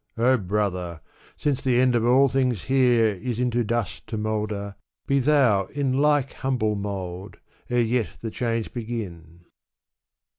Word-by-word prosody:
O 125 +3 +4
brother! 90 -5 -2 0.4
since 145 -3 0
the 125 -2 +2
end 130 0 +4
of 120 -1 +2
all 130 +4 +5
things 125 -5 0
here 125 -4 +3
Is 120 -2 -3
into 120 -1 +1
dust 115 -2 -3
to 110 - -4
moulder, 105 -1 -2 0.3
be 140 0 +2
thou 130 -8 +3
in 140 +3 -2
Like 145 -1 +2
humble 125 -5 -1
mould, 95 -2 -5 0.3
ere 120 0 +2
yet 115 0 +1
the 115 - -5
change 115 -2 -2
begin.'' 90 -8 -6
115 Hz, 145 wpm, -24 LUFS, 105-130 Hz, 0.4 s, all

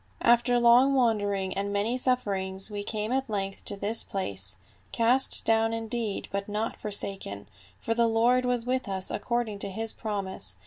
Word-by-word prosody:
"After 240 +1 +4
long 245 +3 +5
wandering 205 -6 +1
and 200 +1 -2
many 205 +4 0
sufferings 200 -6 -1
we 205 -1 -4
came 215 +2 -3
at 265 -1 -1
length 195 -2 -3
to 205 - +4
this 210 +3 0
place, 100 - 0 0.3
cast 245 +3 +3
down 225 0 +2
indeed 225 -2 -3
but 200 +1 -3
not 210 +2 -2
forsaken, 195 - -4 0.3
for 225 - -2
the 235 0 +2
Lord 235 +3 +3
was 245 -2 -1
with 255 -3 -1
us 190 -1 -2
according 235 -4 -2
to 200 - -2
his 225 +3 -3
promise. 190 - -3
220 Hz, 165 wpm, -27 LUFS, 195-235 Hz, 0.3 s, long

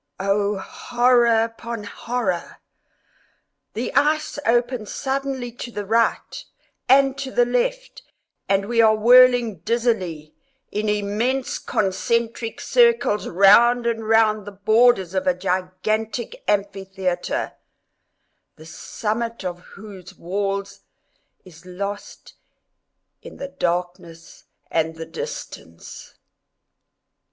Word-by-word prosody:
Oh, 200 +1 0
horror 240 +2 +2
upon 230 -1 -6
horror!—the 205 -4 -7
ice 305 0 +1
opens 240 -1 0
suddenly 270 -2 -3
to 245 +1 -8
the 205 -2 -5
right, 230 +3 0 0.5
and 270 0 +5
to 275 -1 -4
the 245 -2 +2
left, - - -2 0.5
and 195 0 +2
we 230 +2 +2
are 220 -1 +5
whirling 240 -2 +5
dizzily, 185 -7 -2 0.4
in 210 +1 -2
immense 210 +6 -1
concentric 225 +3 -1
circles, 470 - +2
round 235 +6 +5
and 225 -2 -2
round 215 -2 +3
the - - -6
borders 205 -1 +3
of 190 -1 -2
a 180 - +3
gigantic 210 - -3
amphitheatre, 190 -3 -2 1.0
the 155 - -15
summit 220 +6 -4
of 175 -1 -4
whose 195 -1 -13
walls 200 +3 -3 0.7
is 170 -3 -16
lost 200 +3 -7 0.9
in - - -12
the 275 - -6
darkness 175 -4 -4 0.3
and 160 0 0
the 165 0 -7
distance. 85 - -9
215 Hz, 100 wpm, -22 LUFS, 190-240 Hz, 1.0 s, and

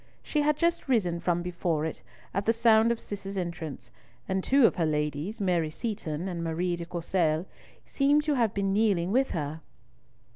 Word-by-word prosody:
She 300 - 0
had 295 0 +2
just 340 0 0
risen 185 -10 +1
from 175 0 0
before 170 -3 -1
it, 160 -6 -5 0.3
at 195 +2 -1
the 225 - +5
sound 230 0 +4
of 235 - -1
Cis's 200 -1 -6
entrance, 170 -5 -5 0.4
and 190 -1 -1
two 275 -2 +5
of - - +3
her 170 - +2
ladies, 150 +7 -2
Mary 175 -5 +1
Seaton 180 -3 -4
and 170 -3 -3
Marie 170 +2 -1
de 170 -1 -7
Courcelles, 170 -1 0 0.4
seemed 290 +2 +2
to 300 -1 +1
have 235 -6 +2
been 195 -1 -1
kneeling 195 -4 +2
with 265 +4 +2
her. 155 -1 -4
185 Hz, 180 wpm, -28 LUFS, 170-225 Hz, 0.4 s, the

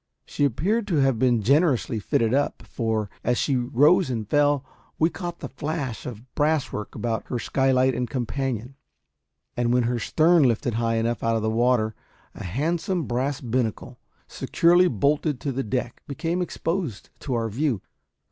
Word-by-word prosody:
She 145 - 0
appeared 195 - 0
to 175 - 0
have 135 -5 +2
been 120 -3 +2
generously 135 - +2
fitted 115 +3 +1
up; 140 +1 0
for, 110 -3 -2 0.2
as 125 0 +1
she 140 - +1
rose 140 +8 +3
and 110 -4 -3
fell, 145 +1 +2 0.3
we 160 +2 +2
caught 175 -2 -6
the 140 - -4
flash 140 -4 -4
of 120 +1 -9
brass 150 -1 +1
work 105 - -5
about 115 -3 -2
her 125 - -2
skylight 130 +2 +2
and 125 -1 -2
companion, 130 -1 -3 0.8
and 120 -1 +1
when 125 0 +3
her 120 +1 0
stern 165 +7 +4
lifted 120 -1 +2
high 115 0 0
enough 115 +1 0
out 115 0 +2
of 110 - -1
the 110 - +1
water 115 -1 +2 0.4
a - - -9
handsome 165 - -1
brass 130 +2 -2
binnacle, 120 0 -2 0.3
securely 175 +2 +3
bolted 145 - +1
to 140 - -2
the 135 +1 -2
deck, 120 +1 -3
became 165 +5 -2
exposed 165 - -3
to 130 -4 -3
our 115 -1 0
view. 120 +1 -1
130 Hz, 165 wpm, -24 LUFS, 115-150 Hz, 0.8 s, stern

